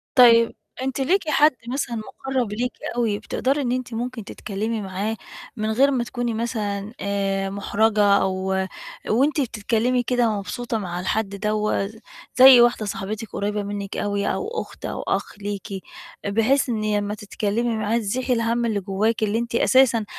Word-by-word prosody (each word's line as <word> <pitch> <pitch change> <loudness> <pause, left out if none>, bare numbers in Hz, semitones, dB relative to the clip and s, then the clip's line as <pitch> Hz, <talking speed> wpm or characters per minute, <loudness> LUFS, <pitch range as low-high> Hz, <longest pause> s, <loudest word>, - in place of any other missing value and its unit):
طيب. 230 -2 +7 0.3
أنتِ 265 +1 -2
ليكِ 340 +4 +1
حد 300 0 +5 0.2
مثلًا 245 -1 -2
مُقرَّب 250 0 -3
ليكِ 245 +3 -1 0.2
أوي، 225 -4 0
بتقدري 275 +3 -1
إن 245 -3 -1
أنتِ 255 -1 -3
ممكن 240 0 -4
تتكلمي 215 +2 -4
معاه 200 +3 -3 0.4
من 215 0 -1
غير 275 +5 +4
ما 250 -3 +1
تكوني 240 -1 -3
مثلًا 215 -2 -3
آآ، 195 -1 -1
محرَجة 205 +2 +1
أو 190 -1 0 0.7
وأنتِ 280 +6 +2
بتتكلمي 235 +1 0
كده 245 -1 +2
مبسوطة 235 +3 -3
مع 180 -4 -4
الحد 200 +3 -1
دوّة؟ 210 0 -1 0.4
زي 260 -1 +9
واحدة 240 -3 +3
صاحبتِك 210 +2 -4
قريِّبة 205 +1 -2
منِك 200 -1 -5
أوي 205 0 -1
أو 420 - -3
أخت - - -10
أو - - -4
أخ - - -2
ليكِ، 205 0 -4 0.6
بحيث 225 +7 +2
إن 215 -2 0
لمّا 205 0 -2
تتكلمي 215 +3 -2
معاه 215 +1 0
تزيحي 245 +4 -1
الهَم 230 0 +1
اللي 220 -3 0
جواكِ 205 +4 0
اللي 215 +1 +1
أنتِ 235 0 -3
أساسًا 235 -3 +4
225 Hz, 155 wpm, -23 LUFS, 205-245 Hz, 0.7 s, زي